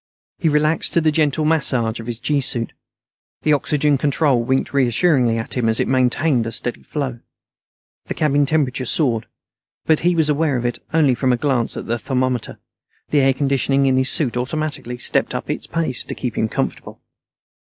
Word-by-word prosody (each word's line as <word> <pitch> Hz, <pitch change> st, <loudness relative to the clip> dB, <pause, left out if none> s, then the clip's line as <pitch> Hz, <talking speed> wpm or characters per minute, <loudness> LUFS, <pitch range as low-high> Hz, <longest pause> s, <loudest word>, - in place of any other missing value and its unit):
He 165 Hz, -, +2 dB
relaxed 150 Hz, +2 st, +1 dB
to 170 Hz, -, +3 dB
the 155 Hz, -1 st, +2 dB
gentle 150 Hz, 0 st, +1 dB
massage 130 Hz, -8 st, +2 dB
of 115 Hz, -, -8 dB
his 120 Hz, -1 st, -4 dB
gee 140 Hz, +3 st, 0 dB
suit. 120 Hz, -3 st, +1 dB, 0.7 s
The 155 Hz, -, +3 dB
oxygen 145 Hz, -1 st, +1 dB
control 140 Hz, -3 st, +2 dB
winked 130 Hz, +4 st, -1 dB
reassuringly 125 Hz, -2 st, +2 dB
at 115 Hz, -, -4 dB
him 120 Hz, -3 st, 0 dB
as 110 Hz, -, +2 dB
it -, -, 0 dB
maintained 130 Hz, 0 st, +1 dB
a -, -, -4 dB
steady 120 Hz, +1 st, -4 dB
flow. 130 Hz, -5 st, -4 dB, 0.9 s
The -, -, -5 dB
cabin 145 Hz, -2 st, +2 dB
temperature 135 Hz, -4 st, 0 dB
soared, 120 Hz, -7 st, 0 dB, 0.6 s
but 160 Hz, -1 st, +3 dB
he 175 Hz, +1 st, +1 dB
was 160 Hz, -2 st, +2 dB
aware 150 Hz, -2 st, +1 dB
of 120 Hz, -, -3 dB
it 120 Hz, -, -2 dB
only 155 Hz, -5 st, +3 dB
from 130 Hz, +1 st, 0 dB
a 125 Hz, -, +2 dB
glance 130 Hz, -3 st, -1 dB
at -, -, -6 dB
a 120 Hz, +1 st, -1 dB
thermometer; 130 Hz, -3 st, -2 dB, 0.5 s
the 150 Hz, -, +3 dB
air 135 Hz, -1 st, +3 dB
conditioning 140 Hz, 0 st, +1 dB
in 130 Hz, -1 st, +2 dB
his 130 Hz, 0 st, +2 dB
suit 135 Hz, -7 st, 0 dB
automatically 135 Hz, -1 st, -3 dB
stepped -, -, +1 dB
up -, -, -3 dB
its -, -, -5 dB
pace 160 Hz, -7 st, -1 dB
to -, -, -6 dB
keep 125 Hz, -4 st, -4 dB
him 110 Hz, -, 0 dB
comfortable. -, -, -4 dB
135 Hz, 185 wpm, -20 LUFS, 120-150 Hz, 0.9 s, to